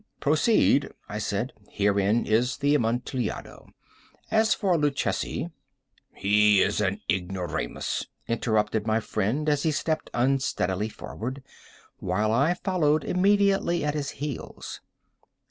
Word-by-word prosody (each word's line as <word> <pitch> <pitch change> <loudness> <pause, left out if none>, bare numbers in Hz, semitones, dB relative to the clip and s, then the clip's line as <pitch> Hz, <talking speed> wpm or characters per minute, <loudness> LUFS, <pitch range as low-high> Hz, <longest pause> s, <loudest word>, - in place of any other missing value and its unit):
"Proceed," 150 -1 +3 0.2
I 105 - -4
said; 105 +4 -2 0.2
"herein 100 +2 +2
is 120 +3 +1
the 145 +1 +2
Amontillado. 120 -1 -2 0.6
As 220 0 +4
for 190 -5 +1
Luchesi—" 150 +2 -1 0.6
"He 105 0 +4
is 100 +1 0
an 100 -1 -1
ignoramus," 90 -7 -2 0.2
interrupted 110 -2 0
my 110 0 +2
friend, 115 +7 -1
as 145 -2 +2
he 160 - +1
stepped 155 +1 -1
unsteadily 120 -6 0
forward, 130 +5 -6 0.6
while 105 +4 0
I 140 +9 +3
followed 155 -5 +1
immediately 195 -3 +2
at 150 - 0
his 145 -2 -2
heels. 145 -1 -6
125 Hz, 110 wpm, -26 LUFS, 105-150 Hz, 0.6 s, As